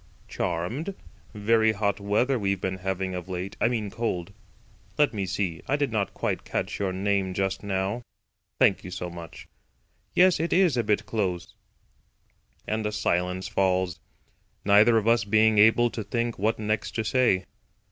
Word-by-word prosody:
"CHARMED. 105 - -3 0.4
Very 110 +1 +3
hot 100 -1 -1
weather 110 +6 +1
we've 100 -2 0
been 95 0 -2
having 95 0 -2
of 90 0 -6
late—I 95 +4 -2
mean 110 -4 -2
cold. 100 -5 -3 0.6
Let 150 -4 +3
me 100 -3 -2
see, 90 -3 -2
I 140 - +2
did 145 -3 -1
not 100 -4 -1
quite - - -2
catch - - -3
your 100 -2 0
name 95 0 -1
just 95 0 -1
now. 100 +3 -2 0.6
Thank - - +3
you 90 - -7
so 90 -1 -5
much. 85 -1 -10 0.7
Yes, 180 -1 +5
it 165 +1 0
is 180 -6 +4
a 120 - +1
bit 105 -1 0
close." 95 -6 -2 1.1
And 110 0 -2
a - - -2
silence 90 -3 -1
falls, 95 -2 0 0.7
neither 105 +3 +6
of 110 0 0
us 115 -3 +4
being 110 +1 +3
able 115 +2 +5
to 110 - -4
think 115 +2 -2
what 110 +3 +1
next 105 0 -2
to 110 - 0
say. 110 -5 +2
100 Hz, 160 wpm, -26 LUFS, 95-115 Hz, 1.1 s, neither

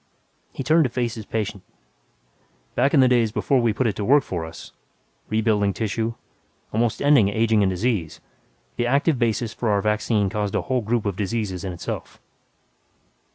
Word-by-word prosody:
He - - -5
turned 160 +5 +4
to - - 0
face 120 -1 -2
his 110 -3 -8
patient, 105 -3 -3 1.1
"Back 135 +5 +2
in 140 - +6
the 130 - +6
days 120 -3 +3
before 130 +3 +1
we 115 -1 +2
put 125 +5 -1
it 110 -3 0
to 105 - -2
work 140 +6 +4
for 85 -3 -4
us 80 - -10 0.6
rebuilding 105 -2 +1
tissue, 110 +2 -2 0.6
almost 115 +3 0
ending 140 -9 +5
aging 110 +1 +2
and 100 - +3
disease 95 -3 -1 0.6
the 120 - 0
active 140 +2 +2
basis 115 -1 0
for 115 - -2
our 100 -1 +1
vaccine 105 -1 +1
caused 105 0 -2
a - - 0
whole 130 -1 0
group 115 0 -1
of 100 -3 -1
diseases, 100 -3 -2
in 95 - -3
itself." 85 - -6
110 Hz, 175 wpm, -23 LUFS, 100-120 Hz, 1.1 s, in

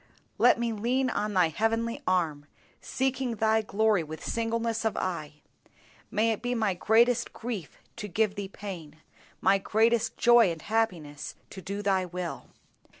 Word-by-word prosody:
Let - - +6
me 235 -1 0
lean 250 +4 0
on 210 -1 -2
Thy 180 -3 +4
heavenly 225 +5 -1
arm, 160 -6 0 0.3
seeking 265 -2 -1
Thy 220 +1 +2
glory 215 -2 +2
with 160 0 -8
singleness 230 0 -1
of 220 - -1
eye. 155 -5 -4 0.7
May 220 +2 +2
it 220 - -3
be 245 +1 -1
my 215 -4 +1
greatest 230 +6 +3
grief 220 -9 -6 0.2
to 210 -3 -5
give 210 +2 +1
Thee 200 -1 -5
pain, 180 -7 -8 0.5
my 195 0 +4
greatest 225 +3 +1
joy 240 -4 +6
and 165 -2 -7
happiness 180 -10 -2 0.2
to 190 - -8
do 200 +3 -5
Thy 190 -2 +1
will. 180 -1 -5
210 Hz, 150 wpm, -28 LUFS, 185-230 Hz, 0.7 s, Let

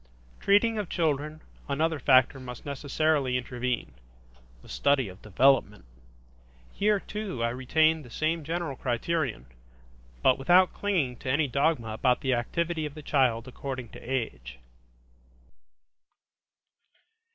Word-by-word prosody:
Treating 215 +3 +3
of 205 - -4
children, 155 -2 -1 0.3
another 155 +2 0
factor 130 0 +4
must 125 -2 -9
necessarily 140 -1 0
intervene: 125 - -3 0.7
the - - -15
study 140 -4 +1
of 95 0 -12
development. 110 - +2 0.9
Here 210 0 +2
too, 205 - -5
I 115 - +2
retained 155 +6 +2
the 125 - -13
same 160 +5 -1
general 165 -2 -3
criterion, 125 - -2 0.8
but 130 - +4
without 180 +6 +4
clinging 165 -12 -1
to 130 - -6
any 145 +3 +2
dogma 140 -3 0
about 125 +3 +1
the 130 -1 +1
activity 160 +6 -1
of 145 - -12
the 155 - -9
child 125 -5 +1
according 130 -2 -6
to - - -11
age. 110 - -4
140 Hz, 120 wpm, -28 LUFS, 125-160 Hz, 0.9 s, factor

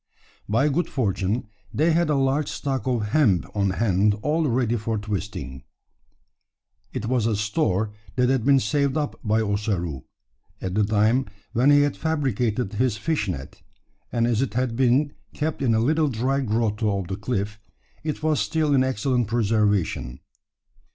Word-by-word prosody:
By 115 +7 +3
good 165 +4 0
fortune 105 -2 -1 0.3
they 160 +3 +2
had 170 0 +2
a 150 - +3
large 135 +2 +1
stock 135 -2 -3
of 115 -5 0
hemp 110 - +3
on 100 -1 +2
hand 100 0 +2
all 155 +1 +1
ready 120 -2 +1
for 110 0 -2
twisting. 100 - -5 1.3
It 125 -4 -4
was 120 -1 +1
a 110 - +1
store 105 - 0 0.2
that 125 0 +3
had 130 -2 +1
been 140 +1 +5
saved 140 +1 0
up 150 -2 -2
by 110 +1 +2
Ossaroo 100 -8 -2 0.5
at 95 - -4
the 105 +2 +2
time 110 +5 +2 0.3
when 125 +5 +4
he 145 0 +6
had 145 -1 +1
fabricated 125 -8 -1
his 115 0 +1
fish 145 -2 -1
net; 70 -8 -6 0.5
and 115 -1 +1
as 120 -1 +1
it 135 - -2
had 125 -2 0
been 135 +4 +2 0.2
kept 155 0 -2
in 120 -4 +2
a - - +3
little 155 +6 +2
dry 130 +2 0
grotto 110 -4 0
of 95 -3 -4
the 95 - -3
cliff, 105 0 -3 0.4
it 155 0 -4
was 155 -2 +2
still 155 -2 +1
in 130 -2 +4
excellent 125 -1 0
preservation. 105 - 0
115 Hz, 165 wpm, -24 LUFS, 105-135 Hz, 1.3 s, he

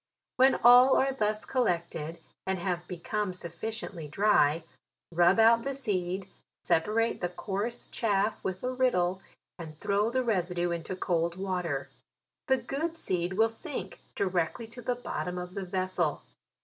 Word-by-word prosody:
When 265 +1 +6
all 250 +2 +8
are 270 0 +2
thus 215 -3 -1
collect 175 -10 0
ed, 160 +2 -5 0.3
and 190 0 0
have 175 -1 -2
become 185 +3 -3
sufficiently 180 0 -6
dry, 160 -3 +3 0.5
rub 175 +3 +4
out 230 +1 +6
the 275 +2 -3
seed, 190 -6 -2 0.4
separate 220 +7 +1
the 175 - 0
coarse 205 +6 -3
chaff 210 -1 0
with 185 -1 -3
a 255 - 0
riddle, 190 -8 +1 0.4
and 155 -2 -9
throw 205 +2 +1
the 255 +2 0
residue 180 -6 0
into 170 +2 -3
cold 170 -2 0
water. 180 -7 -2 0.6
The 265 - +4
good 290 +7 -3
seed 180 - -1
will 220 +4 +4
sink 225 - -6 0.2
directly 185 +4 -1
to 245 +2 -8
the 245 +1 -1
bot 245 - -4
tom 180 0 -3
of 180 0 -6
the 195 -1 -4
vessel. 185 -4 -1
190 Hz, 150 wpm, -29 LUFS, 175-230 Hz, 0.6 s, all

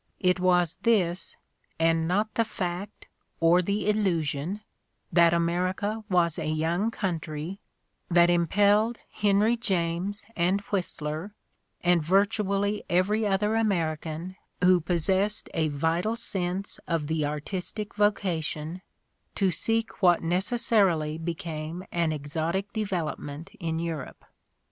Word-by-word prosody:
It 180 0 +2
was 180 -2 +2
this, 190 -6 +1 0.4
and 165 0 +2
not 210 +5 0
the 230 - +2
fact, 190 -2 -5 0.3
or 170 +2 +5
the 200 +3 -1
illusion, 180 -3 0 0.5
that 170 0 +6
America 185 +6 0
was 170 -3 +2
a - - -3
"young" 165 +7 0
country, 170 -3 -4 0.5
that 175 0 +6
impelled 205 +6 +3
Henry 210 +3 +3
James 190 -2 -2
and 180 +3 +2
Whistler, 175 0 -3 0.5
and 175 -1 +4
virtually 200 +3 +1
every 205 +5 +2
other 210 +2 +1
American 170 -4 -1 0.3
who 180 -1 +6
possessed 190 +5 0
a 160 -1 +1
vital 165 +9 0
sense 190 -4 -3
of 165 -3 0
the 160 0 -1
artistic 180 +8 -4
vocation, 180 -5 -1 0.5
to 195 -2 +2
seek 225 +7 -1
what 175 -3 +5
necessarily 180 -4 +1
became 165 0 -5
an 170 -2 +1
exotic 160 +7 -2
development 165 -5 -3
in 165 -3 -2
Europe. 165 -5 -5
180 Hz, 110 wpm, -27 LUFS, 165-205 Hz, 0.5 s, that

